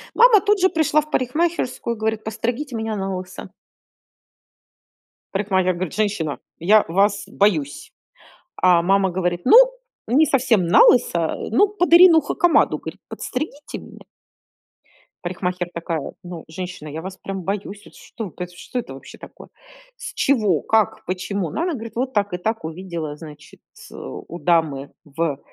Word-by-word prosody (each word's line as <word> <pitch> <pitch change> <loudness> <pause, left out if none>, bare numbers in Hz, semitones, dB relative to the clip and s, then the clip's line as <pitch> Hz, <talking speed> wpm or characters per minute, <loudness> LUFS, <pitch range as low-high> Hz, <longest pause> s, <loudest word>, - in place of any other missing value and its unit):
Мама 470 -3 +7
тут 415 0 +2
же 375 - +5
пришла 315 -3 +2
в 305 0 -12
парикмахерскую 255 -3 -1
и - - -15
говорит: 220 0 -2
"Подстригите 240 +5 -3
меня 220 -1 -3
налысо". 190 -1 -5 1.8
Парикмахер 190 -2 +1
говорит: 175 -1 -4
"Женщина, 200 -9 -1 0.2
я 205 +6 +4
вас 200 +4 +1
боюсь". 160 -9 0 0.7
А 180 -2 +5
мама 195 +2 +2
говорит: 175 -1 -1
"Ну, 445 - +8 0.5
не 275 +8 +4
совсем 240 - +2
налысо, 170 -3 +4 0.2
ну, 275 - +4
под 360 -4 0
Ирину 340 -2 +8
Хакамаду,"- 350 -1 +2
говорит, - - -9
"подстригите 290 +2 -6
меня". - - -14 1.2
Парикмахер 180 0 -3
такая: 165 -3 -4
"Ну, 175 -3 -8
женщина, 175 -1 -7
я 155 +2 -6
вас 190 +1 -8
прям 195 -1 -5
боюсь, 200 +2 -4
вот - - -17
что 220 -4 -8
э 180 - -3
т 175 0 -19
что 250 - -5
это 220 - -6
вообще 135 - -12
такое? - - -13 0.5
С - - -8
чего, 210 - +2
как, 220 -3 +1
почему?" 185 -1 -3
Ну, - - -4
она 350 -1 -1
говорит: 230 -3 -8
"Вот 255 +2 -1
так 205 -2 0
и 180 - -2
так, 220 0 -3
увидела, 165 -2 -5
значит, 150 -1 -13
ц - - -15
у 170 - -8
дамы 160 -6 0
в 150 -1 -2
195 Hz, 150 wpm, -21 LUFS, 175-245 Hz, 1.8 s, Ну